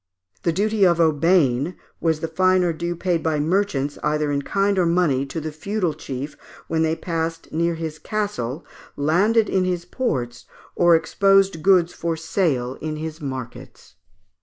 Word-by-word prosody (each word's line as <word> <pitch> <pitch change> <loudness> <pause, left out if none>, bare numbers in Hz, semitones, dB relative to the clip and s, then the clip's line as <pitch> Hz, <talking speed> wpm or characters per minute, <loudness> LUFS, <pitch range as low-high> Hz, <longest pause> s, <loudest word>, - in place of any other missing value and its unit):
The 170 - +1
duty 210 +4 +1
of 170 -2 +4
aubaine 160 -2 +2 0.2
was 160 -2 0
the 165 - -1
fine 185 +3 +3
or 175 -1 +1
due 170 +2 -3
paid 175 -1 0
by 155 -2 0
merchants, 150 -4 0
either 150 -1 0
in 140 0 0
kind 200 +5 +1
or 175 - +3
money, 160 -6 +2
to 165 - -4
the 155 0 -5
feudal 180 +2 -2
chief, 140 -1 -6 0.3
when 160 -1 0
they 160 0 +1
passed 165 -1 -4
near 170 +1 0
his 160 -1 -5
castle, 170 - -3 0.3
landed 200 +10 +3
in 190 - +1
his 180 -2 -2
ports, 125 - -3 0.3
or 175 -1 +5
exposed 195 0 +3
goods 180 -1 +4
for 165 -1 -2
sale 145 -7 -1
in 155 -1 -3
his 155 +1 -6
markets. 130 -4 -8
165 Hz, 160 wpm, -22 LUFS, 150-185 Hz, 0.3 s, or